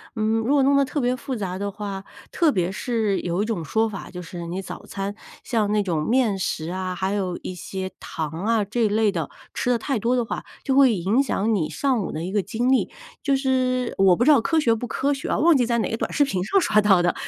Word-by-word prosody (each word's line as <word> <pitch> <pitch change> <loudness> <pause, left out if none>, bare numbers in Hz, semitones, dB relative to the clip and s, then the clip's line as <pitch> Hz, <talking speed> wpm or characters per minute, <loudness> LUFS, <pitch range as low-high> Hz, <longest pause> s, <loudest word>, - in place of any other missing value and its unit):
嗯， 220 0 +1
如 240 +6 +1
果 275 -2 +4
弄 280 +1 +4
得 280 - +4
特 290 - -2
别 245 0 +1
复 255 +1 -4
杂 190 -4 -3
的 200 +1 -2
话， 200 -1 -6 0.3
特 335 -3 +3
别 185 -6 0
是 220 -2 -1
有 175 +3 -1
一 - - -2
种 205 -8 -3
说 220 +8 +1
法， 195 - -7
就 180 -1 -7
是 175 0 -7
你 180 +3 -4
早 185 - -9
餐 195 +1 -4 0.3
像 220 -4 0
那 210 - +2
种 170 -5 -1
面 235 -6 +2
食 160 -3 -2
啊， 185 -1 -3
还 190 +1 -1
有 190 -3 -1
一 185 - -4
些 190 +1 -5
糖 155 -2 -4 0.2
啊， 225 -2 +2
这 220 +3 0
一 - - +4
类 210 0 +2
的， 165 -6 -3 0.2
吃 - - -1
得 245 - +3
太 255 0 -2
多 240 +4 +1
的 245 - +1
话， 225 - -5 0.2
就 270 - 0
会 265 -5 +5
影 195 +9 +2
响 225 -5 0
你 160 -7 0
上 265 -5 0
午 190 - -4
的 160 +2 -4
一 185 - -4
个 205 -1 +1
精 230 +7 -1
力， 265 - +2 0.3
就 275 -2 +2
是 255 -2 0
我 190 -2 +5
不 240 - +1
知 305 - +6
道 280 - +6
科 325 +8 0
学 245 -7 +3
不 235 +2 -3
科 280 +5 0
学 275 - -5
哦， - - 0
忘 330 -2 +6
记 245 - +2
在 235 0 +1
哪 220 - -1
个 225 - -1
短 - - -3
视 290 - +4
频 190 -10 -1
上 390 - +3
刷 215 -10 +3
到 200 -4 +5
的， 175 0 +2
215 Hz, 285 characters per minute, -23 LUFS, 190-255 Hz, 0.3 s, 知